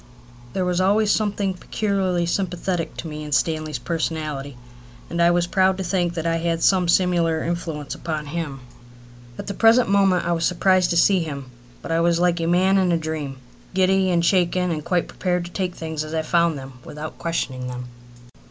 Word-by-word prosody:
There 185 - 0
was 180 0 +1
always 205 +3 +3
something 205 -2 0
peculiarly 185 -2 -1
sympathetic 180 -1 -2
to 165 - -5
me 150 -1 -6
in 150 - -7
Stanley's 155 0 0
personality; 150 0 -3 0.5
and 170 0 0
I 170 - +6
was 175 0 +2
proud 190 +1 +2
to 190 - -3
think 175 -2 0
that 165 -1 -3
I 165 0 +1
had 165 0 -1
some 185 -2 +4
similar 170 -2 +2
influence 165 -4 -4
upon 155 -2 -4
him. 145 -3 -5 0.8
At - - -6
the 200 - -4
present 225 +2 +4
moment 195 -3 +3
I 175 - 0
was 165 -1 0
surprised 185 +1 +3
to 170 - +1
see 190 +2 +5
him, 140 -6 -5 0.3
but - - -5
I 165 - +2
was 170 0 +2
like 175 -1 +2
a 165 - -1
man 185 +3 +3
in 185 -2 +2
a 170 - +3
dream, 155 -4 -4 0.4
giddy 190 0 +3
and 170 -1 +2
shaken 180 -1 +2
and 155 -2 -3
quite 175 +1 0
prepared 180 -2 -2
to 175 - -9
take 185 -2 -3
things 160 -2 -4
as 155 +1 -6
I 160 - 0
found 170 -1 +2
them 135 -1 -10
without 150 +1 -8
questioning 130 -6 -3
them. 125 0 -6
170 Hz, 195 wpm, -22 LUFS, 155-185 Hz, 0.8 s, I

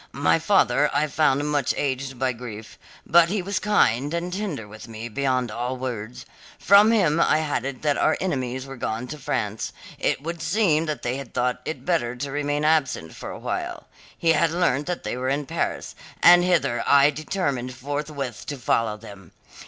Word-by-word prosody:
My - - +3
father - - +3
I 145 +1 +3
found 145 -1 +1
much 145 -4 +1
aged 135 -1 -2
by 130 0 0
grief, 115 -3 -9 0.3
but 170 0 +5
he 200 -1 -1
was 200 +1 -1
kind 145 - +2
and 175 +1 -3
tender 180 - -4
with 110 +2 -11
me 115 +1 -7
beyond 130 -1 0
all 125 +3 -3
words. 120 -3 -5 0.3
From 200 +3 +6
him 170 -9 +3
I 160 - +4
had 150 -5 -1
it 135 0 -5
that 145 -2 +1
our - - +2
enemies 130 -7 -2
were 135 -1 -9
gone 115 0 -3
to 150 - -7
France; 110 -5 -2 0.3
it - - 0
would 170 +1 -5
seem 165 -5 +2
they 125 -4 -2
had 135 -4 -9
thought 125 0 0
it 160 - -5
better 155 -9 0
to 135 +3 -5
remain 145 +1 -1
absent 135 - +1
for - - -8
a - - -7
while. - - -4 0.3
He 165 - 0
had 160 +1 +3
learnt 160 -4 0
that 180 -1 -3
they - - -3
were 130 +1 -2
in 140 +2 -1
Paris, - - -3 0.3
and 175 0 +8
hither 170 -10 +1
I 140 +1 +6
determined 140 -6 -3
forthwith 140 -2 -5
to 145 -3 -4
follow 115 -3 0
them. 100 -5 -13
140 Hz, 185 wpm, -24 LUFS, 125-160 Hz, 0.3 s, and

